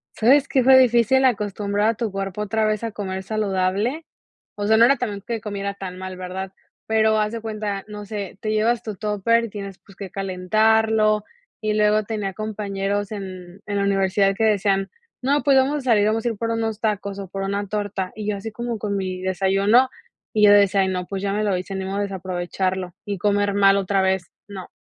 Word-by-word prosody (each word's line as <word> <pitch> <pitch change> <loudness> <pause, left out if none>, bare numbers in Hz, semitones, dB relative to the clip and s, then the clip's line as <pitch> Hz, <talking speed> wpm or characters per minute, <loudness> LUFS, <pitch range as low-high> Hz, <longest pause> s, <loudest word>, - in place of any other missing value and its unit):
¿Sabes 275 +5 +4
qué?, 260 - +2
fue 265 +1 +7
difícil 250 +1 +4
acostumbrar 205 -2 0
a - - +2
tu 230 -1 -3
cuerpo 195 +1 -4
otra 215 +1 0
vez 215 0 0
a 230 - -2
comer 190 -2 -5
saludable. 205 - -1 0.5
O 205 0 -3
sea, 220 +1 +5
no 230 - +7
era 275 +3 +4
también 205 -5 -4
que 230 -2 -3
comiera 200 -1 -4
tan 190 -2 -7
mal, 185 0 -7
¿verdad? 185 +1 -5 0.3
Pero 220 0 +3
haz 210 0 0
de 230 0 -5
cuenta, 210 -3 -4
no 210 -1 -8
sé, 200 -3 -6
te 215 -2 -2
llevas 225 +2 +1
tu 215 -3 -5
tóper 210 +3 +1
y - - -7
tienes, 200 -2 -8
pues, 195 - -18
que 195 -1 -7
calentarlo, 215 +3 +2 0.4
y 215 -1 0
luego 210 0 +3
tenía 205 -2 -3
compañeros 205 -1 -3
en 185 -2 -8
en 205 -1 -2
la 200 - +1
universidad 195 0 +2
que 225 - -1
decían: 200 -2 +2 0.3
“No, 280 +3 +1
pues, 275 -1 +4
vamos 270 +3 +2
a - - -4
salir, 225 -6 +3
vamos 220 +1 0
a - - +2
ir 225 - -5
por 230 +2 -2
unos 225 -1 -2
tacos 200 -2 -2
o 195 - -6
por 195 +1 -4
una 200 +1 -2
torta”, 200 -2 -3
y 210 -1 -6
yo 210 - 0
así 200 +3 -6
como 235 +1 -4
con 205 -1 -2
mi 185 -1 -3
desayuno, 195 +6 +3 0.5
y 215 -2 +2
yo 205 - +7
decía: 200 -1 +5
“Ay, 190 - +1
no, 180 -1 -2
pues, 195 -1 -4
ya 200 - 0
me 210 +1 0
lo 200 -3 +1
hice, 185 +2 -6
ni 190 0 -3
modo 195 +1 -3
desaprovecharlo 185 -1 -3
y 205 -1 -3
comer 205 +1 +1
mal 195 0 +5
otra 195 0 +1
vez, 190 -1 0 0.2
no”. 195 -3 -8
205 Hz, 215 wpm, -22 LUFS, 195-220 Hz, 0.5 s, fue